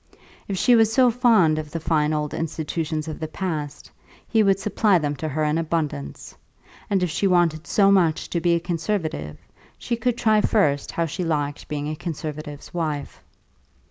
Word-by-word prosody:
If 195 - -3
she 245 +6 +4
was 225 -1 +4
so 250 +1 +4
fond 220 -10 +4
of 155 -1 -6
the 165 - -4
fine 155 -1 +1
old 150 -1 -2
institutions 160 0 -3
of 155 - -6
the 160 - -3
past, 155 -4 -5 0.4
he 225 - +3
would 195 -2 +3
supply 205 -1 +2
them 145 -3 -1
to 155 - -4
her 155 +2 -1
in 150 +2 +1
abundance; 150 - -3 0.5
and 195 -2 +1
if 175 - -1
she 195 - +1
wanted 170 -4 +2
so 200 -1 +4
much 170 -5 +2
to 170 - -1
be 170 0 +3
a - - +1
conservative, 165 - -3 0.4
she 235 - -2
could 235 +1 -1
try 215 -2 +3
first 145 -12 +1
how 170 - -1
she 165 +4 -4
liked 145 -3 -2
being 145 -1 -3
a 155 - -3
conservative's 155 -3 -6
wife. 155 -4 -3
165 Hz, 180 wpm, -23 LUFS, 150-195 Hz, 0.5 s, she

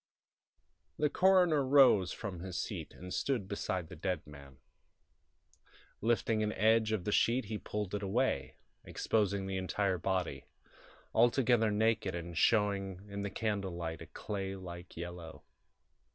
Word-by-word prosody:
III - - -49
The - - +3
coroner 180 -6 +4
rose 130 -9 +5
from 95 -5 -5
his 90 0 -5
seat - - -5
and 90 0 -8
stood 125 -9 -1
beside 95 -3 -3
the - - -10
dead 90 0 -2
man. 70 -2 -13 1.4
Lifting 115 -1 +1
an 105 0 0
edge 110 +1 +3
of 110 -5 -1
the 105 - -2
sheet 120 +3 +2
he 105 +1 -4
pulled 105 -2 -4
it 105 - -2
away, 115 +7 0 0.3
exposing 100 -3 0
the 95 0 -3
entire 95 0 0
body, 90 -7 -2 0.7
altogether 120 -1 +4
naked 105 -3 +1
and 85 0 -6
showing 100 -1 +1
in 100 0 -4
the 100 - -2
candle 100 -4 -2
light 80 -1 -4
a - - -9
clay 95 -2 -4
like 90 -2 -9
yellow. 85 -1 -7
100 Hz, 145 wpm, -33 LUFS, 90-110 Hz, 1.4 s, rose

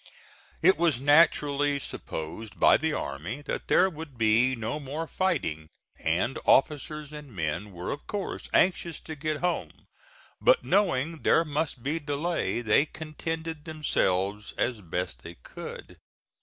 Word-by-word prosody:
It 190 - +6
was 165 -7 +3
naturally 145 -1 +4
supposed 95 - -6
by - - +7
the - - +1
army 85 - -4
that - - -4
there 185 - +5
would 160 -6 -8
be 115 +4 +4
no 115 +6 -3
more 150 +3 -4
fighting, 80 - -1 0.4
and 85 +11 +1
officers 150 +1 +2
and 150 -3 -9
men 85 +2 -3
were 90 -1 -5
of 145 - -6
course 205 -2 -4
anxious 175 -3 +2
to 160 - -7
get 155 0 -3
home, 180 0 -2 0.6
but - - +5
knowing 165 -6 +1
there 165 - +4
must 150 -4 -2
be 155 +4 -1
delay 145 -2 -1
they 120 +6 +4
contented 160 0 -5
themselves 105 - 0
as 120 -3 0
best 90 +1 -4
they 85 0 -9
could. - - -10
145 Hz, 140 wpm, -28 LUFS, 105-160 Hz, 0.6 s, by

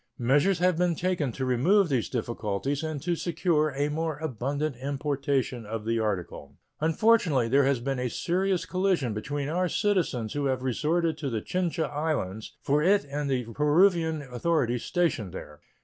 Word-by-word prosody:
Measures 145 +10 +3
have 180 -1 +2
been 175 -2 +2
taken 170 -6 -1
to 130 +2 -3
remove 170 - +3
these 130 -7 0
difficulties 120 +3 -2
and 155 -3 -4
to 175 0 0
secure 165 -2 +1
a 145 +1 +1
more 155 0 -2
abundant 145 0 -2
importation 135 -2 -1
of 110 0 -5
the 115 0 0
article. 90 -9 -3 0.2
Unfortunately, 160 - +3
there 135 +3 +4
has 135 -2 +2
been 135 +1 -2
a 125 0 -1
serious 185 - 0
collision 180 - 0
between 140 +7 -3
our 180 +4 0
citizens 165 - 0
who 145 -1 -1
have 130 -1 -1
resorted 155 +5 0
to 140 - -2
the 110 -4 -3
Chincha 175 -3 -1
Islands 145 -10 -3
for 145 +2 +2
it 195 +1 +3
and 145 0 -2
the 130 -2 0
Peruvian 160 - +3
authorities 125 -2 0
stationed 155 - 0
there. 75 -5 -9
145 Hz, 165 wpm, -27 LUFS, 125-170 Hz, 0.2 s, there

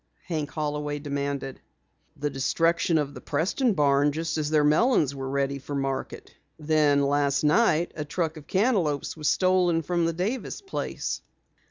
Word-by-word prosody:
Hank 155 -5 -3
Holloway 150 -1 -3
demanded. 140 -2 -4 0.6
"The 145 0 -2
destruction 165 +5 +1
of 145 -2 -1
the - - -10
Preston 195 - 0
barn 145 0 +3
just 160 +2 -3
as 150 -1 -1
their 155 -1 +3
melons 150 - +3
were 135 -1 -5
ready 140 0 -1
for 140 +2 -6
market. 135 -1 -4 0.2
Then 150 -2 +2
last 140 0 +1
night 170 +1 +3
a 150 - -3
truck 160 +1 -2
of 155 -1 -12
cantaloupes 185 - +1
was 155 -2 -3
stolen 180 -3 +2
from 170 +1 0
the 165 - 0
Davis 205 +8 -3
place." 390 -1 -4
150 Hz, 155 wpm, -26 LUFS, 140-170 Hz, 0.6 s, barn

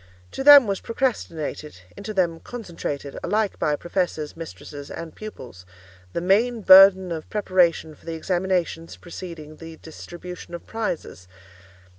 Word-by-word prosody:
To - - -4
them 285 -2 +10
was 195 -2 -2
procrastinated—into 165 - -4
them 175 -5 0
concentrated, 165 - -6
alike 215 -1 -1
by 150 - +1
professors, 175 -2 -3
mistresses, 150 -3 -9
and 165 -1 -7
pupils—the 90 - -10
main 220 +6 +2
burden 190 -1 +8
of 160 -2 -5
preparation 180 -6 +1
for 150 - -21
the 165 - -3
examinations 175 -1 -2
preceding 165 -3 -9
the 165 -1 -10
distribution 175 +2 -10
of 170 - -10
prizes. 190 - -5
170 Hz, 120 wpm, -23 LUFS, 155-195 Hz, -, them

